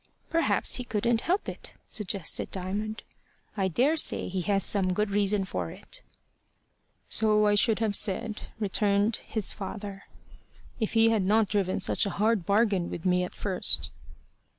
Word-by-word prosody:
"Perhaps 330 0 +2
he 250 - -4
couldn't 230 0 0
help 370 +4 -1
it," - - -7
suggested 200 -3 -2
Diamond. 205 +4 -4 0.5
"I 195 -3 0
daresay 275 - +2
he 185 0 -2
has 195 -2 +3
some 185 -2 +3
good 210 0 0
reason 200 -1 +2
for 90 - -4
it." - - -8 1.1
"So 215 -1 +3
I 205 - +3
should 215 +2 +4
have 220 -2 0
said," 210 +2 0
returned 205 +1 +1
his 220 -3 -2
father, 200 0 -7 0.7
"if 220 - -2
he 225 0 +5
had 225 -2 +2
not 210 +2 +2
driven 195 -3 0
such - - +2
a - - -5
hard 215 -4 +1
bargain 200 -4 +2
with 165 - -7
me 180 0 +2
at 180 - -6
first." 135 - -2
205 Hz, 150 wpm, -28 LUFS, 190-220 Hz, 1.1 s, he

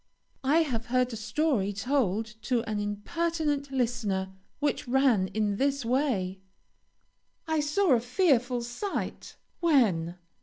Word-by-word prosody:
I 305 +5 +4
have 235 -7 -3
heard 250 0 +1
a - - -3
story 225 -1 0
told 220 0 0 0.2
to 240 -1 0
an 215 -1 -1
impertinent 290 +7 -1
listener, 225 -7 -1 0.3
which 290 -3 -1
ran 245 -7 +3
in 205 0 -1
this 275 0 0
way: 230 -8 0 1.1
"I 315 -1 +1
saw 300 +5 +2
a 240 - +4
fearful 250 -2 +1
sight 245 - -4
" - - -44
"When?" 210 - +2
245 Hz, 125 wpm, -28 LUFS, 210-290 Hz, 1.1 s, I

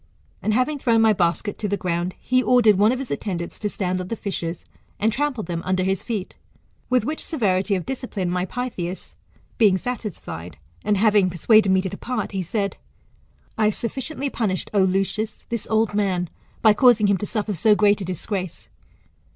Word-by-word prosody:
And 215 - +1
having 280 +4 +1
thrown 230 -3 +3
my 220 -1 +5
basket 180 +2 -1
to 210 - -1
the 200 0 -1
ground, 175 0 -2
he 255 0 +2
ordered 235 -6 +4
one 210 +2 +5
of 255 - 0
his 270 -1 -6
attendants 175 -5 -4
to 210 - -1
stand 185 -2 -2
on 180 - -6
the 230 - -3
fishes, 175 -5 -4 0.3
and 220 +1 +2
trample 280 -3 -1
them 170 -1 -4
under 185 0 0
his 190 0 0
feet 210 -6 -4 0.5
With 250 -3 +2
which 310 +4 -3
severity 200 - +1
of 180 - -3
discipline 235 -9 -3
my 180 +1 -1
Pytheas 190 -8 -5 0.5
lieing 205 -4 +5
satisfied, 200 - -6 0.3
and 210 -1 +2
having 205 -2 +4
persuaded 200 +4 +4
me 190 0 +4
to 190 - -2
depart, 250 +7 -4
he 195 -2 -2
said, 200 +3 -2 0.8
I 215 - +4
have 210 - +2
sufficiently 270 +4 -3
punished, 190 -6 -2
O 200 - +4
Lucius, 195 +3 0
this 235 -2 -3
old 220 -1 +2
man, 185 -4 0 0.3
by 215 -2 +7
causing 235 -1 +5
him 200 -1 +3
to 205 - -4
suffer 215 -2 -2
so 210 +5 +4
greni 205 0 +3
a - - -3
disgrace. 185 0 -4
205 Hz, 185 wpm, -23 LUFS, 185-230 Hz, 0.8 s, by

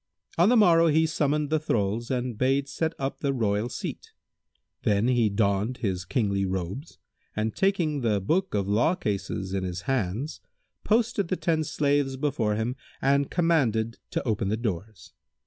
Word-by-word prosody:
On 175 +5 +4
the 245 - +5
morrow 170 -5 +6
he 160 +1 +4
summoned 150 -2 0
the 155 - +3
thralls 115 -5 -1
and 125 -2 -2
bade 135 +4 +1
set 160 +4 -2
up 135 0 -3
the 140 - 0
royal 110 -3 0
seat; - - -6 0.7
then 105 +2 +2
he 120 -4 +3
donned 100 +3 0
his 95 -6 -2
kingly 100 0 0
robes 95 - -4 0.4
and 110 +1 -1
taking 170 -7 +1
the 110 -4 +1
Book 165 - 0
of 100 -2 0
law 120 - +2
cases[FN#163] 100 - -3
in - - -5
his 90 -1 -4
hands, 120 - -2 0.4
posted 220 -3 +1
the 185 - -1
ten 160 -2 +1
slaves 145 -2 0
before 130 -7 0
him 115 +4 -2 0.2
and 140 0 +2
commanded 120 - +1
to - - -3
open 105 -3 0
the 110 - 0
doors. 105 -3 -5
125 Hz, 165 wpm, -26 LUFS, 105-155 Hz, 0.7 s, morrow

